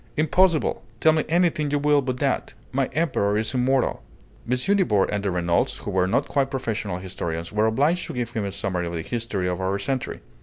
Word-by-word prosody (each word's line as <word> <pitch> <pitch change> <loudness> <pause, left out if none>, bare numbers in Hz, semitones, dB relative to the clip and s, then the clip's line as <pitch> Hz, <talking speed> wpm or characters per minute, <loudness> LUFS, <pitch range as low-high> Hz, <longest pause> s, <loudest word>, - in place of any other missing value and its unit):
"Impossible! 160 +2 +3 0.2
Tell 155 - +5
me 155 - +1
anything 170 -3 +2
you 145 - +1
will 145 0 +3
but 130 -1 -3
that! 135 -3 -1 0.2
My 135 0 +1
Emperor 105 -11 0
is 110 +3 -1
immortal." 130 +1 +1 0.5
M. 125 - +2 0.2
Nibor 110 - +3
and 105 -1 -2
the 100 - 0
Renaults, 85 -1 +1
who - - -3
were 95 -1 +2
not 95 - +1
quite 135 -1 +1
professional 110 -8 -3
historians, 85 -2 -5
were 105 +1 +3
obliged 145 +10 +1
to 165 - -6
give 120 -2 -2
him 115 -3 -2
a 100 - -3
summary 90 -3 -2
of 85 - -5
the 80 -1 -3
history 110 -5 -2
of 90 +1 -2
our 95 +1 0
century. 130 +4 -3
120 Hz, 205 wpm, -24 LUFS, 95-145 Hz, 0.5 s, Tell